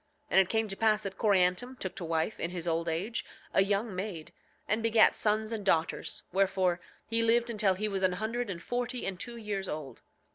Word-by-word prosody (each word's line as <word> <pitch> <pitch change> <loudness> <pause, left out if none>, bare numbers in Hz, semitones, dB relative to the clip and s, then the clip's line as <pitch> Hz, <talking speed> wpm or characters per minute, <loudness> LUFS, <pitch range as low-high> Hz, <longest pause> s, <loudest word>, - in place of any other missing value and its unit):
And - - +6
it 190 - +4
came 220 0 +1
to 195 - -4
pass 215 0 +2
that 195 -1 -6
Coriantum 200 +4 +2
took 190 -5 -4
to 180 - -4
wife, 165 +5 -1
in 170 - -1
his 175 -1 -4
old 165 0 0
age, 195 +9 -2 0.3
a - - +5
young 200 +2 0
maid, 185 -4 -5 0.3
and 215 +2 +1
begat 225 -1 +5
sons 215 +1 +1
and 220 -3 -3
daughters; 165 -4 0
wherefore 185 -1 +2 0.3
he 230 +1 +2
lived 235 +1 +3
until 210 -4 +2
he 210 +3 -1
was 195 -2 -2
an 185 -1 +3
hundred 225 +4 -2
and 170 -3 -5
forty 245 0 -2
and 190 -2 -3
two 240 +3 -6
years 205 -4 -3
old. 150 -3 -6
200 Hz, 210 wpm, -30 LUFS, 180-225 Hz, 0.3 s, And